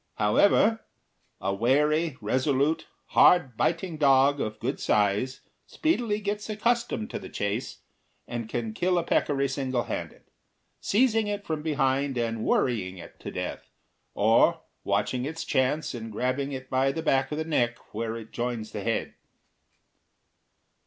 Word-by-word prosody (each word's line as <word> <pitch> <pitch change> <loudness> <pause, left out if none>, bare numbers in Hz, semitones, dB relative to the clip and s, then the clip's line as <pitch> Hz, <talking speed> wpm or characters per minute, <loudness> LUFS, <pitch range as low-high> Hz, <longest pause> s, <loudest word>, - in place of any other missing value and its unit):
However, 200 - +4 0.6
a 95 +1 -1
wary, 150 +7 +2
resolute, 140 +4 +1 0.2
hard 135 -10 +5
biting 165 +5 -1
dog 140 -1 +4
of 110 0 -4
good 130 +4 -2
size 105 +5 +1 0.3
speedily 240 -10 0
gets 210 +1 -3
accustomed 235 +1 0
to - - -4
the - - -9
chase, 100 +4 -3 0.5
and 115 -2 -5
can 115 -3 -3
kill 180 +8 +1
a 170 - +1
peccary 140 -4 +1
single 130 -2 -1
handed, - - -6 0.6
seizing 225 -1 +2
it 205 -1 -3
from 160 -4 -2
behind 140 -3 0
and 115 -2 -1
worrying 95 -7 0
it 85 - -12
to - - -6
death, - - -5 0.5
or - - +4 0.2
watching 105 +5 0
its 160 +3 -5
chance 135 +4 0
and 115 -2 -6
grabbing 130 +5 -1
it 130 -1 -6
by 130 +1 +2
the 160 +3 -4
back 135 -3 +2
of 150 - -2
the 160 - -2
neck 120 -7 +1 0.2
where 115 +1 -3
it 115 -1 -10
joins 120 -2 -3
the 105 - -5
head. 115 +2 -2
135 Hz, 145 wpm, -27 LUFS, 115-160 Hz, 0.6 s, hard